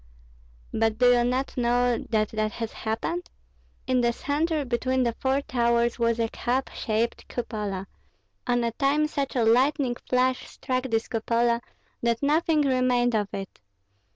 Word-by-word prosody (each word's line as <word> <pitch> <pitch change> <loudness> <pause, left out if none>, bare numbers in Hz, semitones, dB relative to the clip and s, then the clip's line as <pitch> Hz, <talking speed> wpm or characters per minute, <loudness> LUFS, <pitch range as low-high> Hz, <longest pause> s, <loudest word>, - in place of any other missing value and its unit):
"But 225 -1 +1
do 245 +1 +5
you 240 -1 +4
not 255 +3 -1
know 245 0 +2
that 215 -2 +1
that 215 -1 -2
has 225 -1 -5
happened? 330 +11 -3 0.6
In 255 -1 +2
the 235 0 +3
centre 295 +4 -1
between 255 +1 0
the 235 -1 0
four 265 +1 +1
towers 235 -1 +1
was 230 -1 +2
a 230 - +2
cap 255 +4 -2
shaped 225 +1 -2
cupola; 210 -5 -4 0.6
on 245 -1 +2
a 235 - 0
time 280 +5 +2
such 280 -3 -3
a 235 -3 +2
lightning 255 +2 +3
flash 255 0 +1
struck 255 0 -3
this 225 -3 0
cupola 235 +1 +1 0.4
that 235 +2 0
nothing 310 +1 +3
remained 255 -3 +2
of 210 -2 +1
it. 195 -1 -7
245 Hz, 155 wpm, -26 LUFS, 230-260 Hz, 0.6 s, do